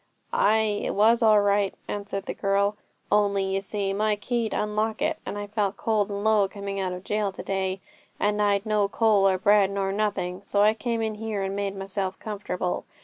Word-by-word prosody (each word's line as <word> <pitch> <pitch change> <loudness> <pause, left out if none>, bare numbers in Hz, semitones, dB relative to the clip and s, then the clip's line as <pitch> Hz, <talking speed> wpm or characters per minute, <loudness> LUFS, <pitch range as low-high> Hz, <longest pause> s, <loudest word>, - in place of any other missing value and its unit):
'Ay, 215 0 +2
it - - -2
was 225 +4 +4
all 215 -2 +6
right,' 200 -1 +1
answered 200 -1 -4
the - - -3
girl, 200 +1 +1 0.4
'only 200 -1 +3
you 190 0 -1
see 200 0 -2
my 210 +1 +1
key 230 +2 -2
'd - - -6
unlock 215 +1 -1
it; 310 +2 0
and - - -4
I 205 - -4
felt 205 -1 -1
cold 215 -3 0
and 200 0 -4
low 215 -2 +4
coming 200 0 -5
out 185 -1 -1
of 180 0 -6
jail 210 -1 -1
to - - -8
day; 190 -1 -2 0.4
and 210 0 +1
I'd 200 0 +2
no 210 -2 +2
coal, 205 -2 +3
nor 190 -1 +2
bread, 200 +1 +4
nor 195 -1 -1
nothing. 195 -3 -2
So 200 0 +1
I 215 +1 +5
came 230 0 -2
in 220 -1 -1
here, 215 -2 -3
and 195 0 -3
made 200 -1 -2
myself 195 -1 -3
comfortable. 200 -4 -3
205 Hz, 205 wpm, -26 LUFS, 195-215 Hz, 0.4 s, all